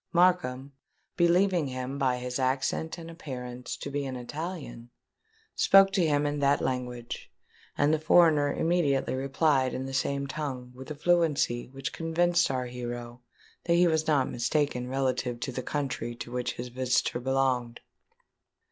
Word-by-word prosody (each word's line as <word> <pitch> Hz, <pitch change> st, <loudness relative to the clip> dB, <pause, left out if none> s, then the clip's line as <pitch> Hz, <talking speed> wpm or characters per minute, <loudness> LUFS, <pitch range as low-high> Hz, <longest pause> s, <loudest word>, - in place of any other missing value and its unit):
Markham, 140 Hz, -7 st, +2 dB, 0.4 s
believing 175 Hz, -1 st, +3 dB
him, 130 Hz, +1 st, -4 dB
by 130 Hz, -3 st, +2 dB
his 125 Hz, +1 st, -4 dB
accent 135 Hz, +5 st, -1 dB
and 165 Hz, -1 st, -9 dB
appearance, 125 Hz, -6 st, -6 dB
to 140 Hz, -, -6 dB
be 145 Hz, 0 st, -1 dB
an 130 Hz, -, -5 dB
Italian, 145 Hz, -2 st, -6 dB, 0.7 s
spoke 195 Hz, 0 st, +6 dB
to 195 Hz, -2 st, +2 dB
him 150 Hz, -2 st, +2 dB
in 145 Hz, 0 st, -1 dB
that 140 Hz, 0 st, +3 dB
language; 125 Hz, -2 st, -4 dB, 0.5 s
and 145 Hz, +2 st, +3 dB
the 155 Hz, -, +2 dB
foreigner 155 Hz, -3 st, +4 dB
immediately 160 Hz, -6 st, +1 dB
replied 135 Hz, 0 st, +1 dB
in 130 Hz, -, -3 dB
the 135 Hz, -, -6 dB
same 140 Hz, +1 st, 0 dB
tongue 130 Hz, -3 st, -5 dB
with 130 Hz, +3 st, -10 dB
a 155 Hz, -, -5 dB
fluency 150 Hz, -7 st, +1 dB
which 135 Hz, -1 st, -6 dB
convinced 175 Hz, +1 st, +2 dB
our 130 Hz, -2 st, -1 dB
hero 120 Hz, 0 st, -6 dB, 0.4 s
that 170 Hz, -, +3 dB
he 175 Hz, +1 st, +5 dB
was 160 Hz, -1 st, +1 dB
not 145 Hz, -4 st, +3 dB
mistaken 125 Hz, +1 st, -1 dB
relative 130 Hz, -2 st, -1 dB
to 130 Hz, -, -3 dB
the 130 Hz, -, -4 dB
country 135 Hz, -4 st, -3 dB
to 120 Hz, 0 st, -8 dB
which 125 Hz, 0 st, -2 dB
his 125 Hz, +1 st, -6 dB
visitor 125 Hz, -1 st, 0 dB
belonged. 130 Hz, -2 st, 0 dB
135 Hz, 155 wpm, -28 LUFS, 125-155 Hz, 0.7 s, spoke